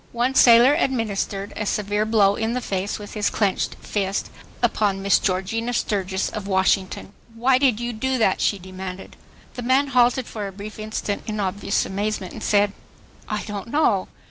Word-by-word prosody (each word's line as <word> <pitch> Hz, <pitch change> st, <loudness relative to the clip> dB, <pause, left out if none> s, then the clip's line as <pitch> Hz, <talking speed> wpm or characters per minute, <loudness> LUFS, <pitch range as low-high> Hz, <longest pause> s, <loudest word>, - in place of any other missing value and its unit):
One 240 Hz, +2 st, +1 dB
sailor 245 Hz, +1 st, +7 dB
administered 215 Hz, -, -1 dB
a -, -, -2 dB
severe 210 Hz, +1 st, 0 dB
blow 205 Hz, -3 st, +4 dB
in 225 Hz, +2 st, -1 dB
the 250 Hz, -, 0 dB
face 195 Hz, -4 st, -3 dB
with 205 Hz, -1 st, -9 dB
his 210 Hz, -2 st, 0 dB
clenched 200 Hz, -3 st, 0 dB
fist 195 Hz, -1 st, -2 dB, 0.3 s
upon 205 Hz, -4 st, +1 dB
Miss 200 Hz, -, +4 dB
Georgina 210 Hz, +6 st, -1 dB
Sturgis 195 Hz, -4 st, -1 dB
of 210 Hz, -3 st, -5 dB
Washington. 190 Hz, 0 st, 0 dB, 0.2 s
"Why 255 Hz, +3 st, +3 dB
did 255 Hz, -5 st, +3 dB
you 240 Hz, 0 st, -3 dB
do 260 Hz, +4 st, -1 dB
that?" 220 Hz, -5 st, +2 dB
she 205 Hz, -, +2 dB
demanded. 185 Hz, 0 st, -8 dB, 0.4 s
The 245 Hz, -, -6 dB
man 260 Hz, +3 st, +2 dB
halted 250 Hz, 0 st, +3 dB
for 210 Hz, -4 st, -5 dB
a -, -, -7 dB
brief 205 Hz, +3 st, -9 dB
instant 215 Hz, -1 st, -3 dB
in 215 Hz, -1 st, -3 dB
obvious 200 Hz, 0 st, 0 dB
amazement 200 Hz, -1 st, -3 dB
and -, -, -8 dB
said, 205 Hz, -1 st, +2 dB, 0.6 s
"I 210 Hz, -1 st, -2 dB
don't 205 Hz, 0 st, -6 dB
know." 230 Hz, -8 st, +2 dB
210 Hz, 170 wpm, -23 LUFS, 195-235 Hz, 0.6 s, sailor